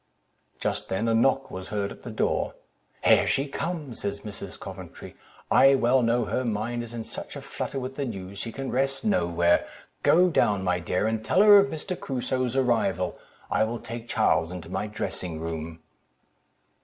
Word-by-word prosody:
Just - - -2
then 95 +5 0
a 115 - +3
knock 135 +4 +2
was 95 0 -6
heard 100 -1 -2
at - - -11
the - - -8
door—"Here - - 0
she 135 +2 +1
comes," 150 -3 -4
said 100 - -1
Mrs. 100 -2 -7
Coventry; 95 -3 -9 0.4
"I 135 0 +7
well 130 0 +3
know 120 0 +2
her 130 - -1
mind 115 +1 -2
is 120 0 -7
in 115 - -4
such - - -7
a - - -5
flutter 135 - -4
with 130 +1 -6
the 140 - -1
news, 100 -4 -6
she 115 - -4
can 135 +2 -5
rest 135 - 0
nowhere. 85 - +2 0.3
Go 180 +2 +5
down, 100 -10 +2
my 90 -1 +1
dear, 90 +3 -1
and 110 0 -1
tell 190 - +4
her 205 -1 +9
of 200 - +3
Mr. 185 +2 -4
Crusoe's 130 -1 -2
arrival; 115 -9 +1 0.3
I - - +3
will 115 +2 -2
take 115 0 -8
Charles 80 +1 +2
into 90 -2 -7
my 95 +3 -2
dressing 90 -5 -4
room." 80 0 -5
115 Hz, 180 wpm, -26 LUFS, 95-135 Hz, 0.4 s, her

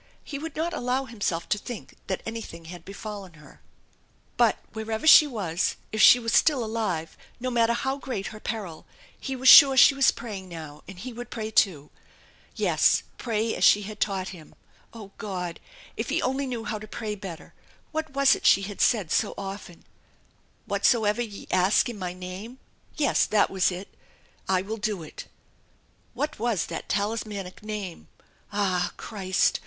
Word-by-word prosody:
He 280 - -6
would 320 0 -7
not 330 +2 -2
allow 255 0 -1
himself 205 -8 -3
to 210 - +1
think 240 +1 -8
that 190 - -3
anything 225 -7 -7
had 175 0 -10
befallen 200 -2 -8
her. 150 -2 -17 0.7
But - - +3 0.2
wherever 220 +3 -4
she 310 -1 +9
was, 190 - -1 0.2
if 215 - 0
she - - +9
was 230 -2 -3
still 285 -6 +4
alive, 215 -8 -3 0.2
no 255 +1 -3
matter 235 -1 +3
how 265 +3 -2
great 245 -8 -4
her 215 - -9
peril, 200 -9 -6 0.3
he 270 - -4
was 260 +1 -1
sure 270 0 +10
she 270 - +8
was 275 -1 +4
praying 195 -5 -5
now, 155 -3 -9
and 195 - -10
he 245 +7 -7
would 245 +1 -8
pray 220 -2 -5
too! 165 -10 +2 0.6
Yes, - - +3 0.2
pray 225 -1 -1
as - - -3
she 205 - +6
had 210 +1 -8
taught 190 -2 -1
him. 170 -5 -12 0.4
Oh, 210 -4 -11
God! 180 -4 -4 0.4
If - - -4
he - - +1
only 265 +2 -1
knew 240 -3 -4
how 220 -2 -4
to 215 - -10
pray 215 0 -4
better! 190 -5 -9 0.4
What 315 0 -3
was 275 0 +4
it - - -4
she 195 - +5
had 200 0 -5
said 205 -9 +2
so - - +1
often? 195 -3 -8 0.4
" - - -38
Whatsoever 220 -1 +2
ye 215 -4 -6
ask 185 +2 +3
in 225 -4 -7
my 180 -1 -4
name 185 +7 -8 0.2
" - - -39
yes, 295 -3 +2
that 210 -1 +2
was 190 -2 +2
it 180 +2 -6 0.4
" - - -26
I 180 - -1
will 220 +3 -5
do 210 -5 -2
it/' 155 - -9 0.9
What 300 -4 -3
was 225 -7 0
that - - -6
talismanic 205 -2 -3
Name? 210 -5 -6 0.4
Ah! 190 -3 0
Christ! 190 -4 0
210 Hz, 180 wpm, -26 LUFS, 185-240 Hz, 0.9 s, sure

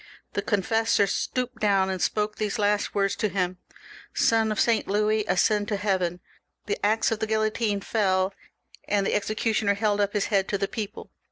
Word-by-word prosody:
The - - -1
confessor 225 +1 +2
stooped 250 +4 -2
down 195 -3 +2
and 185 -1 -4
spoke 210 0 0
these 215 +1 -2
last 205 -1 0
words 195 0 +1
to 215 - 0
him: 185 -1 -2 0.3
— - - -17 0.2
"Sonof 220 -2 +2
Saint 230 -2 +2
Louis, 215 +2 +1
ascend 205 +3 +2
to 215 - -1
heaven!" 185 -4 -1 0.4
The 420 - -3
axe 220 +3 +2
of 225 - -1
the 220 - -1
guillotine 215 -1 0
fell, 190 -3 +1 0.5
and 200 -1 +1
the - - 0
executioner 215 0 0
held 205 0 +1
up 200 0 0
his 210 -2 +1
head 195 -1 +3
to 200 - -1
the 195 0 -1
people. 215 -2 -6
205 Hz, 180 wpm, -26 LUFS, 195-220 Hz, 0.5 s, head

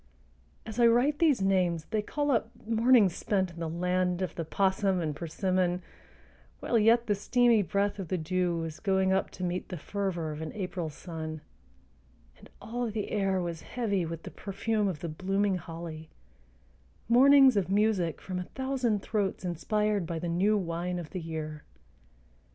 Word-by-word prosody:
As 220 +2 -6
I 235 - +7
write 250 +6 +3
these 295 - +3
names 180 -4 +1
they 215 -2 +1
call 290 +6 -1
up 225 -3 +1 0.2
mornings 225 -3 +4
spent 190 -3 0
in 170 - -11
the 165 -1 -3
land 180 +2 0
of 180 - -3
the 165 - -4
'possum 190 +2 +1
and 155 -3 -2
persimmon 180 +2 -1 0.8
while 235 - +1
yet 230 +2 +4
the 210 - +2
steamy 235 +2 +3
breath 200 +1 -1
of 190 - -4
the 185 - -1
dew 175 +1 0
was 165 -1 -5
going 190 -2 +2
up 190 - +1
to 185 - -8
meet 180 0 -2
the 180 - -5
fervor 175 -2 -3
of 150 +1 -6
an 160 - -5
April 180 -4 -4
sun, 155 0 -7 1.0
and - - -16
all 240 +1 -3
the 210 -1 -4
air 195 -2 +1
was 170 -2 -4
heavy 210 -7 -1
with 165 0 -5
the - - -8
perfume 210 +1 -1
of 175 -6 -3
the 170 - -3
blooming 195 +4 0
holly, 165 -1 -8 1.0
mornings 265 +2 +7
of 195 -3 +1
music 200 -5 +1
from 185 -1 -4
a 180 - -4
thousand 260 -6 0
throats 200 -3 -1
inspired 205 +2 0
by 170 -1 -3
"the 175 +2 -3
new 190 +5 +2
wine 175 -1 -2
of 170 -3 -7
the 185 - -4
year." 155 -2 -5
190 Hz, 175 wpm, -29 LUFS, 170-215 Hz, 1.0 s, I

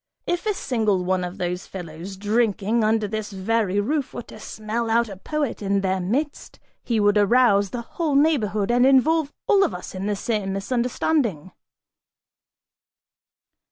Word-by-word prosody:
If 350 +4 -2
a 420 - +1
single 215 - 0
one 185 0 0
of 180 +1 -5
those 180 +1 -3
fellows 175 +1 -8
drinking 215 +1 +1
under 215 0 +2
this 215 0 -4
very 200 0 0
roof 280 +6 -1
were 240 - -5
to 215 - -13
smell 220 +2 -4
out 235 0 +2
a 195 - -7
poet 290 +7 -3
in 200 -1 +1
their 190 -1 0
midst, 260 - -3 0.2
he 230 -3 -1
would 205 0 +4
arouse 205 -2 +4
the 235 +2 -5
whole 305 +3 -2
neighborhood 240 -9 +2
and 245 +1 +4
involve 280 +3 +4
all 400 -2 +4
of 355 - -1
us 180 - -8
in 190 +1 -4
the 210 - 0
same 200 -2 -2
misunderstanding!" 235 - -1
215 Hz, 160 wpm, -23 LUFS, 195-250 Hz, 0.2 s, would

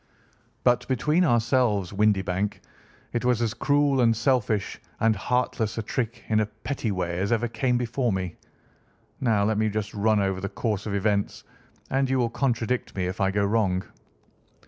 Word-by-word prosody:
But 125 -1 +3
between 150 +7 +2
ourselves, 120 - +2
Windibank, 100 -1 +1 0.5
it 120 - -1
was 125 -2 +2
as 115 -2 0
cruel 140 0 +2
and 115 -2 +3
selfish 110 -4 0 0.2
and 110 -1 +3
heartless 115 -2 -1
a 115 - -1
trick 120 +1 -3
in 110 -1 +2
a 110 - +1
petty 110 +3 -4
way 90 -2 -2
as 100 +3 -1
ever 120 +1 +2
came 120 +2 0
before 120 0 0
me. 95 -3 -3 0.8
Now, 110 -6 +2
let 105 +1 +1
me 110 0 +2
just 105 -1 -3
run 110 +1 +2
over 95 -1 0
the 100 - -3
course 105 -2 -2
of 100 - -2
events, 100 0 0 0.5
and 135 0 +1
you 130 - +2
will 120 -2 +1
contradict 120 -2 -1
me 95 -2 -1
if 90 +2 -4
I 95 - +3
go 100 +1 +1
wrong." 100 -3 +1
110 Hz, 170 wpm, -26 LUFS, 100-125 Hz, 0.8 s, But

